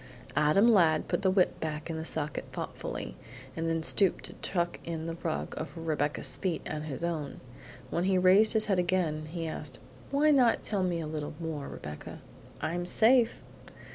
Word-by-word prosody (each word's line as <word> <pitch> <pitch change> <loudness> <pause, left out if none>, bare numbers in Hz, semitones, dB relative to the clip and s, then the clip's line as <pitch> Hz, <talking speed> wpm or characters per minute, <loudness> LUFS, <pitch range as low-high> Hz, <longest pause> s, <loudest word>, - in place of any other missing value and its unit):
Adam 155 +9 +4
Ladd 160 -6 +4
put - - 0
the 190 - +3
whip 185 -1 +2
back 155 -1 -4
in 165 - -4
the 160 - -4
socket 150 -2 -3
thoughtfully, - - -5 0.4
and 165 0 -1
then 165 0 -1
stooped 195 +2 +4
to - - -10
tuck 175 -2 -1
in 165 -1 -4
the 165 - -3
rug 160 - -3
over 155 0 -6
Rebecca's 150 -2 -1
feet 185 -4 -2
and 150 0 -4
his 150 +1 -5
own. 155 -5 -3 0.5
When 170 - 0
he 190 -1 +3
raised 190 +5 +6
his 220 -1 +4
head 195 -3 +1
again 170 -4 0
he 165 +1 -4
asked: 150 -5 -5 0.3
"Why 295 +2 +3
not 250 -5 +4
tell 205 -3 0
me 175 -2 0
a - - -4
little 150 -1 -5
more, 160 -4 -4
Rebecca? 75 0 -8 0.4
I'm 175 +2 -2
safe!" 235 +4 +3
165 Hz, 180 wpm, -30 LUFS, 155-185 Hz, 0.5 s, raised